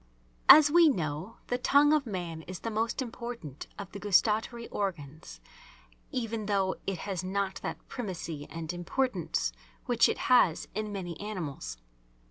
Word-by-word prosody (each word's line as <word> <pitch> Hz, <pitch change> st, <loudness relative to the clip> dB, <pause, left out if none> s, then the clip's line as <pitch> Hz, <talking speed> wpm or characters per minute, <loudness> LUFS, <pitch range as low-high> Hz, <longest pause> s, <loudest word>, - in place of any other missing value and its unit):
As 295 Hz, -1 st, +10 dB
we 335 Hz, 0 st, +7 dB
know 165 Hz, -, -3 dB
the 245 Hz, -, -1 dB
tongue 290 Hz, +3 st, +5 dB
of 295 Hz, -4 st, +2 dB
man 175 Hz, -5 st, -4 dB
is 185 Hz, -1 st, -7 dB
the 230 Hz, -, -3 dB
most 225 Hz, +4 st, -1 dB
important 235 Hz, -, -7 dB
of 200 Hz, -3 st, -7 dB
the 200 Hz, -, -7 dB
gustatory 220 Hz, +4 st, +2 dB
organs, 155 Hz, -, -5 dB, 0.7 s
even 225 Hz, -4 st, -3 dB
though 195 Hz, -2 st, +1 dB
it 195 Hz, -2 st, -1 dB
has 190 Hz, -3 st, -3 dB
not 195 Hz, +1 st, -2 dB
that -, -, -6 dB
primacy 170 Hz, -, -5 dB
and 165 Hz, 0 st, -5 dB
importance 175 Hz, -, -1 dB, 0.3 s
which 240 Hz, -2 st, +4 dB
it -, -, -1 dB
has 245 Hz, -10 st, +3 dB
in 215 Hz, +1 st, -3 dB
many 180 Hz, -4 st, -5 dB
animals. 155 Hz, -, -5 dB
200 Hz, 145 wpm, -30 LUFS, 170-235 Hz, 0.7 s, As